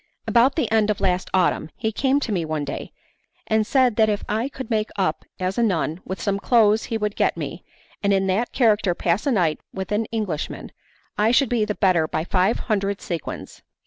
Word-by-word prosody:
About 245 Hz, +3 st, +4 dB
the 250 Hz, -10 st, -1 dB
end 220 Hz, -1 st, +3 dB
of 210 Hz, -, 0 dB
last 185 Hz, -1 st, 0 dB
autumn 180 Hz, -4 st, +1 dB
he 220 Hz, -1 st, -2 dB
came 270 Hz, +5 st, +1 dB
to 240 Hz, -, -3 dB
me 180 Hz, -5 st, 0 dB
one 155 Hz, -2 st, -2 dB
day, 140 Hz, -, -6 dB, 0.5 s
and 220 Hz, -1 st, +1 dB
said 255 Hz, -4 st, +3 dB
that 220 Hz, -1 st, +4 dB
if 205 Hz, -1 st, -1 dB
I 225 Hz, +5 st, -1 dB
could 260 Hz, -4 st, -8 dB
make 215 Hz, -1 st, 0 dB
up 175 Hz, -6 st, -1 dB
as 185 Hz, +4 st, -1 dB
a -, -, +3 dB
nun 180 Hz, -5 st, 0 dB
with 190 Hz, -1 st, -5 dB
some 200 Hz, +3 st, -1 dB
clothes 220 Hz, -1 st, +3 dB
he 225 Hz, -, -2 dB
would 210 Hz, -1 st, -2 dB
get -, -, +1 dB
me, -, -, -5 dB, 0.4 s
and 200 Hz, -, +2 dB
in 195 Hz, -1 st, +2 dB
that 195 Hz, +6 st, 0 dB
character 210 Hz, -7 st, +2 dB
pass 175 Hz, +9 st, 0 dB
a -, -, +3 dB
night 170 Hz, -, +1 dB
with 190 Hz, +1 st, -6 dB
an 210 Hz, +2 st, +1 dB
Englishman, 210 Hz, -9 st, -4 dB, 0.5 s
I 215 Hz, +2 st, +4 dB
should 255 Hz, +1 st, +3 dB
be 230 Hz, -3 st, +1 dB
the 210 Hz, -1 st, -3 dB
better 180 Hz, -5 st, +2 dB
by 155 Hz, 0 st, -2 dB
five 185 Hz, +5 st, +1 dB
hundred 200 Hz, -3 st, -1 dB
sequins. 170 Hz, -4 st, -6 dB
210 Hz, 210 wpm, -23 LUFS, 185-225 Hz, 0.5 s, About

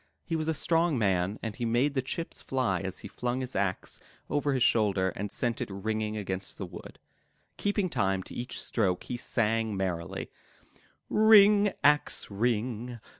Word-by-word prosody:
He 165 Hz, -, -2 dB
was 155 Hz, -1 st, -1 dB
a 160 Hz, -, +1 dB
strong 165 Hz, -1 st, +2 dB
man 95 Hz, -2 st, +1 dB
and 110 Hz, -3 st, -4 dB
he 120 Hz, -, -5 dB
made 120 Hz, +5 st, +2 dB
the 135 Hz, -, +1 dB
chips 165 Hz, +6 st, -5 dB
fly 125 Hz, -9 st, 0 dB
as 95 Hz, 0 st, -4 dB
he -, -, -4 dB
flung 125 Hz, +5 st, -2 dB
his 130 Hz, 0 st, -5 dB
axe 95 Hz, -2 st, -2 dB, 0.3 s
over 145 Hz, -1 st, +1 dB
his 130 Hz, -, +2 dB
shoulder 100 Hz, -6 st, +3 dB
and 100 Hz, +2 st, -5 dB
sent 120 Hz, -2 st, -1 dB
it -, -, -3 dB
ringing 110 Hz, +2 st, -2 dB
against 95 Hz, -2 st, -4 dB
the 95 Hz, -, -4 dB
wood. 90 Hz, -1 st, -10 dB, 0.6 s
Keeping 205 Hz, -1 st, 0 dB
time 95 Hz, -, 0 dB
to -, -, -11 dB
each 120 Hz, +1 st, -4 dB
stroke, 95 Hz, -6 st, 0 dB
he 125 Hz, -, -4 dB
sang 115 Hz, -3 st, 0 dB
merrily: 90 Hz, -3 st, -3 dB, 0.8 s
*'Ring, 210 Hz, -1 st, +6 dB
axe, 150 Hz, -6 st, +3 dB
ring! 120 Hz, +2 st, -1 dB
115 Hz, 170 wpm, -29 LUFS, 100-135 Hz, 0.8 s, Ring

